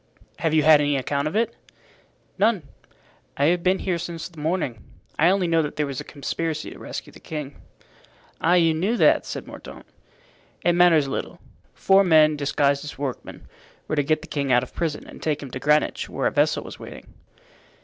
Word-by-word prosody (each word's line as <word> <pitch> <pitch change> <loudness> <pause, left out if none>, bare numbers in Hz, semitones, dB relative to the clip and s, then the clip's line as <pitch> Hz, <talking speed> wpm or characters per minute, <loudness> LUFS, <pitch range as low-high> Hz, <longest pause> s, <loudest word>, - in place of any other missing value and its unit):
"Have 160 -1 +1
you 155 - +4
had 155 -1 +7
any 145 -1 +1
account 140 +2 -1
of 155 - -4
it?" 230 +1 0 0.8
"None. 210 -4 +2 0.7
I 140 - +2
have 175 - -3
been 185 +2 +2
here 180 -3 -2
since 170 0 -5
the 170 -4 -15
morning. 150 - -2 0.4
I 165 +3 +5
only 190 -1 +2
know 165 -1 +2
that 150 -1 -4
there 150 - 0
was 140 -2 -5
a - - -8
conspiracy 155 +2 -4
to - - -11
rescue - - -7
the - - -14
king." 150 -3 -7 0.8
"Ah, 175 +2 +4
you 165 -2 +4
knew 195 +9 0
that?" - - +4
said - - -5
Mordaunt. - - -11 0.8
"It 175 - +4
matters 170 -4 +5
little. 135 - -5 0.4
Four 195 +1 +4
men, 155 -4 +5
disguised 140 -1 +1
as 150 - -8
workmen, 135 -2 -6 0.4
were 155 - -1
to 145 - +2
get 155 +2 0
the - - -10
king 140 -4 -2
out 125 0 +4
of 130 - -10
prison 160 -3 -3
and - - -13
take 150 -2 -1
him 135 - -9
to 130 - -5
Greenwich, 150 +2 +1
where - - -3
a - - +2
vessel - - +1
was - - -10
waiting." - - -11
155 Hz, 200 wpm, -23 LUFS, 145-175 Hz, 0.8 s, had